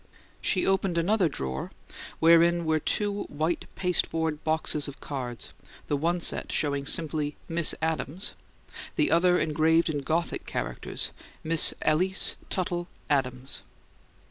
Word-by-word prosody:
She 185 Hz, -, +1 dB
opened 195 Hz, -2 st, +1 dB
another 180 Hz, +1 st, +2 dB
drawer 65 Hz, -, -4 dB, 0.5 s
wherein 170 Hz, +1 st, +5 dB
were 160 Hz, 0 st, +2 dB
two 205 Hz, +5 st, -1 dB
white 155 Hz, +4 st, -2 dB
pasteboard 160 Hz, -4 st, 0 dB
boxes 155 Hz, -2 st, 0 dB
of 140 Hz, -, -9 dB
cards, 125 Hz, -5 st, -6 dB, 0.4 s
the 145 Hz, -, +2 dB
one 170 Hz, +5 st, 0 dB
set -, -, +4 dB
showing 140 Hz, -2 st, 0 dB
simply 150 Hz, -2 st, +1 dB
"Miss 165 Hz, -1 st, +1 dB
Adams," 160 Hz, +2 st, -2 dB, 0.6 s
the -, -, +2 dB
other 180 Hz, +1 st, +4 dB
engraved 160 Hz, +1 st, +2 dB
in 145 Hz, -, -2 dB
Gothic 165 Hz, +4 st, -2 dB
characters, -, -, -3 dB, 0.3 s
"Miss 160 Hz, 0 st, +5 dB
Alys 185 Hz, +5 st, +2 dB
Tuttle 175 Hz, -2 st, -2 dB, 0.2 s
Adams." 130 Hz, -1 st, -1 dB
160 Hz, 120 wpm, -27 LUFS, 145-175 Hz, 0.6 s, wherein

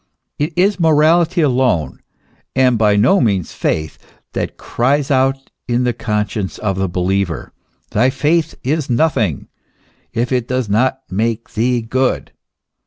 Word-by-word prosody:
It 150 Hz, +3 st, -1 dB
is 190 Hz, +2 st, +2 dB
morality 165 Hz, +2 st, +3 dB
alone, 125 Hz, -, +1 dB, 0.6 s
and 130 Hz, -2 st, +4 dB
by 105 Hz, -2 st, +3 dB
no 120 Hz, -, +4 dB
means 100 Hz, -8 st, 0 dB
faith, 80 Hz, 0 st, -2 dB, 0.3 s
that -, -, -3 dB
cries 140 Hz, +4 st, 0 dB
out 135 Hz, 0 st, +1 dB, 0.2 s
in 120 Hz, 0 st, +1 dB
the 125 Hz, -1 st, +1 dB
conscience 105 Hz, -3 st, -2 dB
of 95 Hz, -3 st, -1 dB
the 95 Hz, -1 st, 0 dB
believer: 90 Hz, -4 st, -1 dB, 0.4 s
thy 125 Hz, +5 st, +3 dB
faith 155 Hz, +4 st, 0 dB
is 150 Hz, +2 st, -1 dB
nothing, 125 Hz, -3 st, +1 dB, 0.6 s
if 120 Hz, +2 st, -2 dB
it 125 Hz, -2 st, 0 dB
does 130 Hz, -2 st, -1 dB
not 125 Hz, +6 st, +1 dB
make 115 Hz, +4 st, -2 dB
thee 120 Hz, +2 st, +1 dB
good. 130 Hz, +3 st, -1 dB
125 Hz, 135 wpm, -17 LUFS, 105-140 Hz, 0.6 s, and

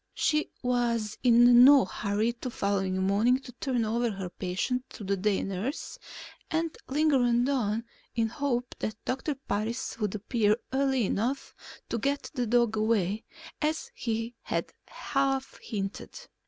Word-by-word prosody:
She 305 Hz, 0 st, +1 dB
was 235 Hz, -3 st, 0 dB
in 240 Hz, 0 st, +7 dB
no 275 Hz, -2 st, +8 dB
hurry 210 Hz, +4 st, -1 dB
the 255 Hz, -, -3 dB
following 195 Hz, -4 st, -1 dB
morning 210 Hz, +6 st, +3 dB
to 250 Hz, -, -10 dB
turn 245 Hz, -1 st, -1 dB
over 235 Hz, +2 st, 0 dB
her 195 Hz, -3 st, -5 dB
patient 195 Hz, +9 st, -2 dB
to 215 Hz, -, -8 dB
the 200 Hz, 0 st, 0 dB
day 200 Hz, +1 st, +1 dB
nurse 215 Hz, -, -4 dB, 0.5 s
and 325 Hz, -1 st, -1 dB
lingered 290 Hz, -1 st, +3 dB, 0.3 s
on 230 Hz, -5 st, 0 dB, 0.3 s
in 230 Hz, -1 st, +2 dB
the -, -, -14 dB
hope 250 Hz, -4 st, -1 dB
that 215 Hz, -, -3 dB
Doctor 265 Hz, +3 st, -1 dB
Parris 230 Hz, -3 st, -3 dB
would 210 Hz, -2 st, -1 dB
appear 215 Hz, 0 st, +1 dB, 0.2 s
early 265 Hz, -3 st, +2 dB
enough 245 Hz, +8 st, -1 dB, 0.4 s
to 230 Hz, -, -1 dB
get 280 Hz, +4 st, -1 dB
the 250 Hz, -4 st, -1 dB
dog 235 Hz, -1 st, +2 dB
away, 215 Hz, -1 st, +1 dB, 0.4 s
as 315 Hz, +11 st, -1 dB
he 230 Hz, -, -3 dB
had -, -, -3 dB
half 270 Hz, -1 st, -1 dB
hinted. 200 Hz, -, -5 dB
235 Hz, 145 wpm, -28 LUFS, 210-265 Hz, 0.5 s, no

